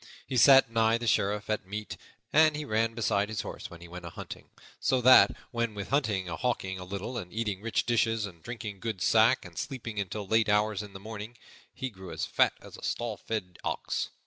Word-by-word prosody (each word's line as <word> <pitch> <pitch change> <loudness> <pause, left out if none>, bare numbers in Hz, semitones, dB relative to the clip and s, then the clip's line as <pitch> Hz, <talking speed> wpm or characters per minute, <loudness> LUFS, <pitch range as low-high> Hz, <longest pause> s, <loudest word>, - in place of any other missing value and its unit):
He 130 - -4
sat 135 0 +7
nigh 115 0 +3
the 120 - -5
Sheriff 105 -1 +1
at 105 -3 -2
meat, 105 +2 -5 0.4
and 155 0 +6
he 150 0 -4
ran 115 -1 0
beside 105 -3 +1
his 110 -2 -2
horse - - -7
when 85 0 -12
he 85 - -10
went 90 +1 -9
a 85 - -6
hunting; - - -9 0.3
so 130 - +2
that, 130 +1 +8 0.2
what 115 -1 -1
with 100 -1 -5
hunting 110 -10 +1
and 80 -2 -5
hawking 95 -7 -1
a - - -6
little, 100 +6 -4
and 90 -4 -8
eating 105 -4 -2
rich 115 +1 0
dishes 115 -2 +1
and 85 -5 -11
drinking 110 -3 -6
good 105 -3 -3
sack, 115 +3 +4
and 85 -2 -8
sleeping 115 -6 -5
until 100 +1 -3
late 110 +2 +2
hours 105 0 +2
in 105 -2 -10
the 95 - -8
morning, 110 +3 -8 0.3
he 130 -1 -5
grew 95 -3 -10
as - - -2
fat - - +3
as - - -11
a - - -14
stall 120 -2 -2
fed 100 -6 -5
ox. - - -2
110 Hz, 220 wpm, -29 LUFS, 100-115 Hz, 0.4 s, that